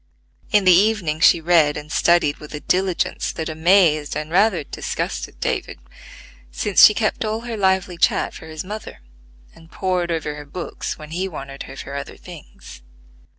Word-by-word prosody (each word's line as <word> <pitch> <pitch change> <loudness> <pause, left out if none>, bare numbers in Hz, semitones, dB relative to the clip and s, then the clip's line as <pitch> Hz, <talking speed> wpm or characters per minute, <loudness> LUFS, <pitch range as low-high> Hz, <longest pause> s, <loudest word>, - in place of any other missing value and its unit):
In 205 -2 +3
the 185 - +7
evening 185 -5 +2
she 165 - +6
read 160 -3 +3
and 150 +1 -9
studied 170 -5 +2
with 150 0 -10
a - - -5
diligence 185 +2 -1
that 160 0 -4
amazed 160 -2 +3
and 155 +1 -5
rather 190 -2 +3
disgusted - - -5
David; - - -3 0.7
since 195 - +3
she 210 - +9
kept 215 +1 -1
all 220 +1 -2
her 235 -1 -5
lively 190 -3 0
chat - - +2
for 160 - -11
his 155 -1 -6
mother, 210 - -8 0.5
and 165 0 -18
pored 180 -1 -2
over 155 -2 -2
her 150 0 -9
books 170 +4 -6
when 155 0 -11
he 185 +3 -2
wanted 140 -5 -8
her 135 - -9
for - - -8
other 140 -1 -6
things. - - -13
170 Hz, 170 wpm, -21 LUFS, 150-190 Hz, 0.7 s, she